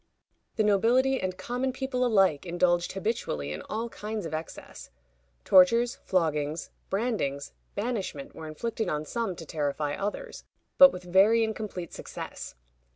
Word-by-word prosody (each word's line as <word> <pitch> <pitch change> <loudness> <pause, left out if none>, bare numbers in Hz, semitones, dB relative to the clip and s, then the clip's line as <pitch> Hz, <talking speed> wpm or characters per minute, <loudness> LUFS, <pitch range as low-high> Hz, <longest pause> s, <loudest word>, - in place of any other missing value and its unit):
The 220 - +2
nobility 240 +6 +3
and 185 -1 -3
common 250 +2 -2
people 260 -1 -2
alike 195 - +3
indulged 175 0 +1
habitually 195 - -2
in 75 +1 -5
all 225 +2 -2
kinds 215 -3 -5
of 160 - -6
excess. 155 +1 -7 0.6
Tortures, 230 +6 +5
floggings, 155 -3 -1 0.2
brandings, 195 - -2 0.2
banishment, 200 - -3
were 160 - -8
inflicted 220 +8 -3
on 150 0 -2
some 230 -1 -2
to 165 - -9
terrify 145 -1 -2
others, 210 - -4 0.4
but 275 0 +11
with 180 0 -8
very 195 +6 +5
incomplete 215 -5 -4
success. - - -7
195 Hz, 135 wpm, -28 LUFS, 160-230 Hz, 0.6 s, but